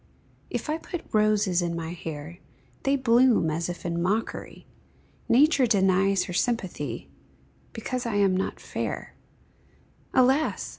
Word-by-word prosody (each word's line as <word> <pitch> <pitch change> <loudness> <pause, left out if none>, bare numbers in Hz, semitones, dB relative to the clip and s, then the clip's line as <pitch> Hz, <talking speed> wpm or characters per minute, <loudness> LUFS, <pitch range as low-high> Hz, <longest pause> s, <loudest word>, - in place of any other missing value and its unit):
If - - -4
I 310 +2 -1
put 350 0 -6
roses 210 -4 +3
in 170 -1 -2
my 165 -1 -4
hair, 160 0 -7 0.5
They 275 +1 +3
bloom 240 - +4
as 165 +2 -2
if 175 - -7
in 170 0 -1
mockery; 205 +6 -2 0.6
Nature 275 +1 +5
denies 195 -2 +3
her 180 - -6
sympathy, 175 - -2 0.6
Because 245 +2 -4
I 225 - -2
am 200 -2 +3
not 190 - -2
fair; - - -5 1.0
Alas! 265 +4 +2
200 Hz, 130 wpm, -26 LUFS, 175-245 Hz, 1.0 s, Nature